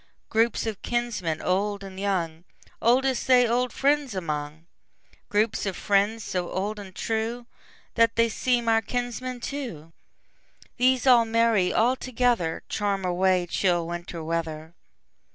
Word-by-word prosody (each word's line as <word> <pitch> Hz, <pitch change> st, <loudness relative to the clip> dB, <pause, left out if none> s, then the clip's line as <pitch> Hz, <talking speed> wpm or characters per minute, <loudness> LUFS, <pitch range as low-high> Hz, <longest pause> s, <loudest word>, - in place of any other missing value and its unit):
Groups 225 Hz, +1 st, +1 dB
of 220 Hz, -3 st, -4 dB
kinsmen, 230 Hz, -10 st, -2 dB
old 200 Hz, +2 st, 0 dB
and 190 Hz, -1 st, -9 dB
young, 175 Hz, -5 st, -2 dB, 0.4 s
Oldest 255 Hz, +2 st, +2 dB
they 250 Hz, -2 st, +6 dB
old 245 Hz, +1 st, +1 dB
friends 280 Hz, -3 st, +1 dB
among; 155 Hz, -2 st, -4 dB, 0.6 s
Groups 210 Hz, 0 st, +1 dB
of 190 Hz, -, -3 dB
friends, 205 Hz, +3 st, +1 dB
so 180 Hz, -2 st, -3 dB
old 210 Hz, +3 st, -3 dB
and 190 Hz, -2 st, -10 dB
trueThat 230 Hz, 0 st, -2 dB
they 230 Hz, 0 st, +4 dB
seem 240 Hz, +1 st, 0 dB
our 225 Hz, 0 st, +4 dB
kinsmen 245 Hz, +2 st, -4 dB
too; 235 Hz, -, -6 dB, 0.8 s
These 255 Hz, +1 st, +3 dB
all 245 Hz, -3 st, +6 dB
merry 225 Hz, -4 st, +2 dB
all 245 Hz, +3 st, +3 dB
togetherCharm 205 Hz, -5 st, -1 dB
away 180 Hz, 0 st, +2 dB
chill 175 Hz, -1 st, +1 dB
Winter 170 Hz, -1 st, -6 dB
weather. 160 Hz, 0 st, -4 dB
210 Hz, 125 wpm, -26 LUFS, 180-240 Hz, 0.8 s, they